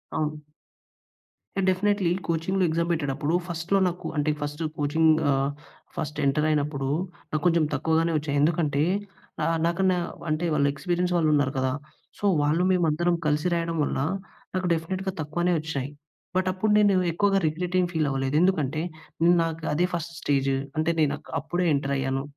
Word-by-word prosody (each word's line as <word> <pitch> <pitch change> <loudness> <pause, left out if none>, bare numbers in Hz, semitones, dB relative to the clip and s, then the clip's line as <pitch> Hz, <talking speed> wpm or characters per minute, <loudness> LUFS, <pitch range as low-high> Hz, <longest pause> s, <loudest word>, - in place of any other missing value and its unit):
అవును. 155 0 -1 1.2
అ! - - +2
Definitely, 195 -1 +1 0.2
కోచింగ్‌లో 170 +3 0
exam 170 +2 0
పెట్టేటప్పుడు 145 0 -1
ఫస్ట్‌లో 170 +3 0
నాకు 180 0 -4
అంటే 150 +1 +1
ఫస్ట్ 145 +2 -4 0.2
కోచింగ్ 160 +2 +3 0.2
ఆహ్, 135 +1 +1 0.4
ఫస్ట్ 150 -2 -4
ఎంటర్ 150 +3 +2
అయినప్పుడు, 145 -2 0 0.4
నాకు 155 - -1
కొంచెం 170 -2 +4
తక్కువగానే 160 +3 +1
వచ్చాయి. 145 -1 -2
ఎందుకంటే 150 -2 +2 0.6
ఆహ్, 165 0 +1
నాకన్నా 185 +1 +2 0.3
అంటే 155 +3 0
వాళ్ళ 140 -1 +2
ఎక్స్పీరియన్స్ 180 +3 -1
వాళ్ళు 155 -2 +2
ఉన్నారు 145 -2 +2
కదా! 130 0 +1 0.5
సో - - -17 0.2
వాళ్ళు 155 +5 +2
మేమందరం 170 0 +2
కలిసి 150 +3 +1
రాయడం 165 -1 -1
వల్ల, 135 - -1 0.6
నాకు 185 -1 0
డెఫినెట్‌గా 185 +4 -2
తక్కువనే 175 +4 0
వచ్చినయి. 140 -4 -3 0.5
బట్ 185 0 +1
అప్పుడు 210 +3 0
నేను 205 -2 +4 0.2
ఎక్కువగా 195 +3 +2
రిగ్రెట్ 175 +4 -2
ఏం 180 - +3
ఫీల్ 155 -3 0
అవ్వలేదు. 135 +1 -1
ఎందుకంటే 155 -5 +1 0.4
నేను 175 +1 +6
నాకు 165 0 -4
అదే 175 +4 +2
ఫస్ట్ 170 0 -3
స్టేజ్, 135 -1 +1 0.3
అంటే 155 +1 +1
నేను 145 -1 +2
అక్ - - -15
అప్పుడే 175 +3 -1
ఎంటర్ 140 0 -1
అయ్యాను. 135 0 -1
160 Hz, 155 wpm, -26 LUFS, 145-175 Hz, 1.2 s, నేను